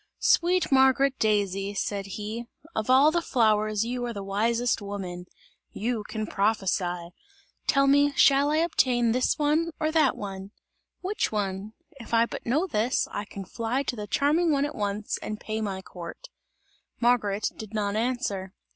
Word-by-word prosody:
"Sweet 355 -1 +2
Margaret 265 0 +4
Daisy," 200 -2 0
said 200 -1 -2
he, 220 +3 -5 0.3
"of 220 +2 -2
all 270 +4 +6
the 345 +1 +1
flowers 215 -5 +2
you 245 +1 -3
are 240 - -4
the 200 -2 -6
wisest 230 +4 0
woman! 185 -3 -6 0.5
You 225 0 -2
can 215 -1 -3
prophesy! 190 -5 0 0.6
Tell 275 -1 +4
me, 285 +1 +4
shall 280 +1 +5
I 305 - +2
obtain 250 -8 +2
this 250 +2 +1
one 310 +2 +1
or 310 0 0
that 310 -4 +3
one? 195 0 -7 0.5
Which 390 +3 -1
one? 200 0 -3 0.3
If 235 -1 -3
I 230 0 +5
but - - -8
know 295 +10 +2
this, 245 - 0
I 205 - -4
can 195 -1 -8
fly 235 +7 -2
to 250 - -3
the 210 -2 -6
charming 310 - +2
one 280 -1 +2
at 295 - -4
once, 205 -2 -3
and 215 0 -5
pay 220 0 -4
my 195 -3 -3
court!" 170 -3 -9 0.7
Margaret 220 -4 +1
did 220 0 -9
not 205 -1 -1
answer. 220 -5 -2
225 Hz, 165 wpm, -27 LUFS, 205-270 Hz, 0.7 s, all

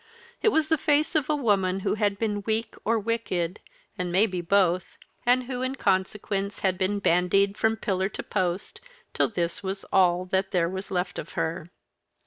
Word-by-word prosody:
It - - +2
was 315 -6 +1
the 320 -2 +2
face 300 +1 +2
of 305 -4 +1
a 305 - +3
woman 195 -8 +1
who - - 0
had 205 -2 0
been 210 -1 -1
weak 220 +2 -2
or 230 +1 +2
wicked, 205 -5 -2 0.4
and 180 -1 -1
maybe 185 -1 +2
both, 185 0 +1 0.3
and 250 +1 +4
who 250 0 -4
in 260 +1 -1
consequence 195 -1 -1
had 190 -2 +2
been 190 +2 0
bandied 195 +2 +2
from 220 +1 +1
pillar 190 -3 -1
to - - -6
post, 185 -2 -2 0.3
till - - +2
this 170 -5 -2
was 195 0 -4
all 180 -1 +4
that 190 +1 0
there 175 -3 +1
was 190 +2 -5
left 180 -1 -2
of 150 - -8
her. 165 +1 -2
195 Hz, 180 wpm, -26 LUFS, 185-225 Hz, 0.4 s, and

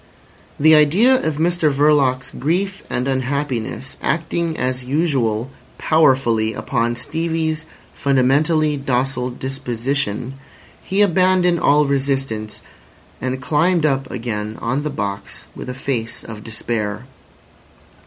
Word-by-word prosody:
The 155 +2 +6
idea 195 - +5
of 155 -2 -1
Mr 165 -1 +2
Verloc's 140 -2 +2
grief 185 +7 -1
and 125 +2 -1
unhappiness 130 -1 -2
acting 165 0 -1
as 130 0 -1
usual 130 -5 0 0.3
powerfully 130 -8 +3
upon 120 -2 -1
Stevie's 160 +3 -2 0.3
fundamentally 145 +3 +2
docile 130 -1 -1
disposition, 130 -1 -3 0.5
he 195 +2 0
abandoned 185 -2 +3
all 150 0 +4
resistance, 135 -6 -1 0.6
and 130 0 -2
climbed 155 +5 +2
up 135 -3 0
again 110 -3 -4
on 130 +5 -1
the 150 - -2
box, 100 -7 -5
with - - -7
a 125 - -5
face 120 -3 -3
of 110 -2 -9
despair. 110 0 -3
135 Hz, 110 wpm, -20 LUFS, 125-155 Hz, 0.6 s, The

